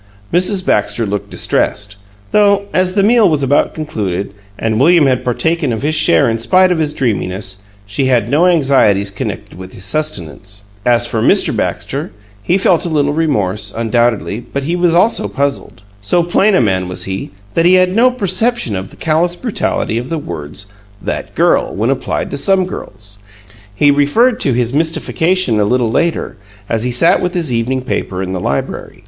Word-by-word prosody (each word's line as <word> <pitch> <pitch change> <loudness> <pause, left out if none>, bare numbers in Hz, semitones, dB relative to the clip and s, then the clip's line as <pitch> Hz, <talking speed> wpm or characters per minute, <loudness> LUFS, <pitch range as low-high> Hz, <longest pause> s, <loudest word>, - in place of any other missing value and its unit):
Mrs. 185 +2 +2
Baxter 115 - 0
looked 105 0 -4
distressed, 105 0 -1 0.3
though, 200 -1 +3
as 185 0 +1
the 200 - +3
meal 220 -1 +4
was 150 -3 0
about 135 +2 +1
concluded, 100 - -4 0.2
and 110 -1 -1
William 165 +2 +5
had 130 -2 +1
partaken 155 +4 0
of 115 +2 -4
his 155 +2 0
share 85 - +4
in 115 0 -1
spite 185 +11 +3
of 175 - 0
his 150 -2 0
dreaminess, 95 -5 -2 0.3
she 100 +7 -2
had 120 -5 +2
no 150 +8 +3
anxieties 130 - +2
connected 95 - -6
with 95 0 -10
his 95 - -6
sustenance. 100 - -3 0.2
As 120 -1 +3
for 115 -2 -2
Mr. - - +3
Baxter, - - -3 0.3
he 175 - +1
felt 180 -3 +2
a 175 - -2
little 145 -2 +1
remorse, 130 - -1
undoubtedly, 115 -2 0
but 140 +3 -5
he 165 +5 -1
was 175 -1 +2
also 195 +7 +2
puzzled. 140 -7 -3 0.2
So 170 +13 +1
plain 195 +4 +2
a - - +4
man 95 -5 0
was 90 - -3
he 95 0 -5 0.2
that 165 +1 +3
he 185 - +5
had 185 0 +2
no 245 +3 +5
perception 225 - +1
of 95 0 -5
the - - -15
callous 170 +2 0
brutality 185 - -2
of 125 - -7
the 165 - -2
words 100 - -6 0.3
"THAT - - -5
GIRL" - - +1
when 110 +6 0
applied 135 -1 -3
to 140 - -3
some 190 +5 +2
girls. 105 - -8 0.6
He 145 +6 +4
referred 180 - +2
to 135 - 0
his 120 0 -1
mystification 160 - +1
a - - +3
little 120 +1 +1
later, 170 +7 -1 0.3
as 115 +2 -1
he - - 0
sat 125 +8 +4
with 180 0 -2
his 165 -8 -1
evening 125 +3 -1
paper 95 -6 -3
in 95 - -5
the 95 - -3
library. 70 -4 -4
135 Hz, 185 wpm, -15 LUFS, 105-175 Hz, 0.6 s, William